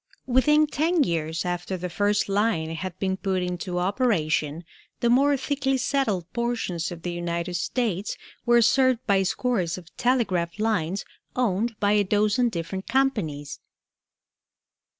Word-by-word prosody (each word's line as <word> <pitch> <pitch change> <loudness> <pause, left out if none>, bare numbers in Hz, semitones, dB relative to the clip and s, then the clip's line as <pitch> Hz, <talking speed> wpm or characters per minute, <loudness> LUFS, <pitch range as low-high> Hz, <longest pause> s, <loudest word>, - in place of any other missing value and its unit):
Within 300 +4 +4
ten 310 +2 +1
years 165 - -2
after 175 +1 -2
the 180 +1 -4
first 205 +4 +1
line 195 -6 +1
had 185 +2 -5
been 190 -1 -1
put 190 -2 -1
into 180 0 -3
operation 180 - 0 0.4
the 235 - +2
more 280 +3 +4
thickly 270 0 0
settled 250 - 0
portions 225 -9 -2
of 170 -1 -8
the 175 - -2
United 175 0 -3
States 205 +2 -1 0.3
were 240 -1 +5
served 260 0 +3
by 200 -3 +3
scores 190 -3 0
of 175 -2 -13
telegraph 200 -9 +1
lines 200 -4 -1 0.3
owned 230 -1 0
by 205 0 +2
a 210 -1 +4
dozen 210 +4 +2
different 185 0 -5
companies. 200 - -1
200 Hz, 135 wpm, -25 LUFS, 175-245 Hz, 0.4 s, were